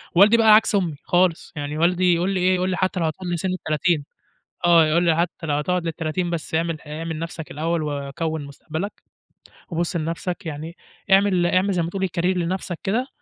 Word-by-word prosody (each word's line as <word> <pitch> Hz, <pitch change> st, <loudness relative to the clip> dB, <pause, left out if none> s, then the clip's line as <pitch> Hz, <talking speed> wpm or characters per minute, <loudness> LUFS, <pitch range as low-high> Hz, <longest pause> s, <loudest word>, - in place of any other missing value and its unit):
والدي 210 Hz, +6 st, +7 dB
بقى 220 Hz, -2 st, +7 dB
عكس 215 Hz, -1 st, +3 dB
أمي 175 Hz, -7 st, 0 dB
خالص 175 Hz, -1 st, +1 dB
يعني 145 Hz, +1 st, -4 dB
والدي 180 Hz, +2 st, +3 dB
يقول 175 Hz, +3 st, 0 dB
لي 195 Hz, -2 st, 0 dB
إيه 185 Hz, +1 st, +3 dB
يقول 185 Hz, +1 st, 0 dB
لي 185 Hz, -, -1 dB
حتى 185 Hz, -1 st, 0 dB
لو 165 Hz, -, +1 dB
هتكمّل 175 Hz, +2 st, -3 dB
سن 190 Hz, -, -1 dB
ال30 160 Hz, -2 st, 0 dB, 0.6 s
آه، 170 Hz, -2 st, +6 dB
يقول 165 Hz, +3 st, +2 dB
لي 165 Hz, -2 st, +3 dB
حتى 170 Hz, -1 st, -2 dB
لو 145 Hz, -, 0 dB
هتقعد 170 Hz, +4 st, 0 dB
لل30 165 Hz, +2 st, -2 dB
بس 165 Hz, -1 st, -4 dB
اعمل 165 Hz, -1 st, 0 dB
ح -, -, -20 dB
اعمل 160 Hz, +1 st, -5 dB
نُفْسك 165 Hz, -1 st, -6 dB
الأول 165 Hz, +2 st, -1 dB
وكوّن 145 Hz, +1 st, -3 dB
مستقبلك 160 Hz, +7 st, -6 dB, 0.7 s
وبُص 170 Hz, +1 st, -2 dB
لنَفْسك 170 Hz, +3 st, -3 dB
يعني 160 Hz, +2 st, -6 dB, 0.4 s
اعمل 195 Hz, -3 st, +4 dB
اعمل 185 Hz, +3 st, +2 dB
زي 175 Hz, -2 st, +1 dB
ما 165 Hz, -, -3 dB
تقول 190 Hz, 0 st, -1 dB
career 170 Hz, -, 0 dB
لنَفْسك 180 Hz, 0 st, -2 dB
كده، 235 Hz, +7 st, 0 dB
170 Hz, 195 wpm, -23 LUFS, 160-185 Hz, 0.7 s, والدي